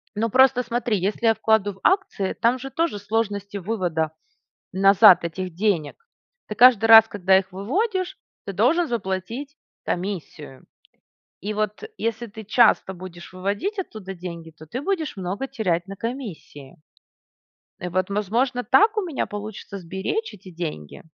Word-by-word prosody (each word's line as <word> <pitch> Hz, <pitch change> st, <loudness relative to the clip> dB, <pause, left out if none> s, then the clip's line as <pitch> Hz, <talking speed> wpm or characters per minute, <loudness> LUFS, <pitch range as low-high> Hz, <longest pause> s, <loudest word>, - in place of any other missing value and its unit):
Ну, 225 Hz, +2 st, 0 dB
просто 260 Hz, +1 st, +4 dB
смотри, 235 Hz, -2 st, -1 dB
если 205 Hz, +5 st, -2 dB
я 225 Hz, -, +6 dB
вкладу 220 Hz, -2 st, +1 dB
в 190 Hz, -, -20 dB
акции, 370 Hz, -, +1 dB
там 240 Hz, +3 st, +1 dB
же 270 Hz, +2 st, -7 dB
тоже 325 Hz, -7 st, -1 dB
сложности 205 Hz, -1 st, -2 dB
вывода 175 Hz, -6 st, -2 dB, 0.6 s
назад 195 Hz, -2 st, +6 dB
этих 180 Hz, +1 st, -5 dB
денег. 200 Hz, -, -1 dB, 0.4 s
Ты 215 Hz, -, -5 dB
каждый 240 Hz, -1 st, +6 dB
раз, 225 Hz, 0 st, +9 dB
когда 190 Hz, -1 st, +3 dB
их 190 Hz, 0 st, -5 dB
выводишь, 370 Hz, -, -2 dB, 0.3 s
ты 195 Hz, -, -4 dB
должен 265 Hz, -, +2 dB
заплатить 230 Hz, +6 st, -4 dB, 0.3 s
комиссию. 175 Hz, -7 st, -5 dB, 0.7 s
И 210 Hz, +4 st, -4 dB
вот, 210 Hz, -, -2 dB
если 230 Hz, +1 st, -3 dB
ты 220 Hz, 0 st, -11 dB
часто 215 Hz, -2 st, +3 dB
будешь 175 Hz, -1 st, -11 dB
выводить 200 Hz, -, -3 dB
оттуда 215 Hz, -, -6 dB
деньги, 170 Hz, -2 st, -8 dB
то 160 Hz, 0 st, -15 dB
ты 250 Hz, -, -5 dB
будешь 330 Hz, -, -2 dB
много 190 Hz, +7 st, -4 dB
терять 190 Hz, -10 st, -1 dB
на 195 Hz, 0 st, -8 dB
комиссии. 205 Hz, -, -7 dB, 1.0 s
Э, 180 Hz, -, -5 dB
вот 185 Hz, +2 st, -1 dB
возможно, 235 Hz, +6 st, 0 dB
так 425 Hz, +11 st, +4 dB
у 425 Hz, -, +1 dB
меня 335 Hz, -7 st, -3 dB
получится 205 Hz, -1 st, -7 dB
сберечь 190 Hz, -, -4 dB
эти 185 Hz, -2 st, -13 dB
деньги? 160 Hz, -, -6 dB
205 Hz, 145 wpm, -23 LUFS, 185-245 Hz, 1.0 s, раз